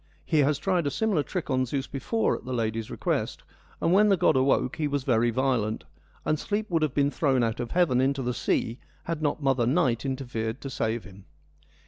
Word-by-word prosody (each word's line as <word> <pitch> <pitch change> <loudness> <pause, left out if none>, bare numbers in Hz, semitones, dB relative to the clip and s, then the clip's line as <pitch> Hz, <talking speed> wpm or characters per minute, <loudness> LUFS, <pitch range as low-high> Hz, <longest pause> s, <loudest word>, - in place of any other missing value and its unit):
He 155 - +2
has 145 0 +3
tried 180 -3 0
a - - +2
similar 205 0 +1
trick 170 0 -4
on 130 0 +2
Zeus 135 +1 -2
before 140 - -1
at - - -8
the 130 +1 -5
lady's 115 -2 -2
request, - - -2 0.4
and 165 - +2
when 210 +2 +5
the 195 - +4
god - - +3
awoke 130 -1 +2
he 155 - 0
was 145 -2 -1
very 120 -2 +2
violent, 115 - 0 0.4
and 155 - +1
Sleep 210 +4 -2
would 165 -2 +2
have 155 -4 0
been 140 0 +2
thrown 130 -1 +2
out 115 0 -1
of 120 - -3
heaven 160 -8 +2
into 135 0 +1
the 125 0 -1
sea 115 +1 -1 0.2
had 165 -2 -3
not 150 0 -1
mother 130 -3 +2
Night 130 -5 +2
interfered 125 -3 -3
to 135 - -6
save 115 -1 -1
him. 95 0 -14
135 Hz, 210 wpm, -27 LUFS, 120-155 Hz, 0.4 s, when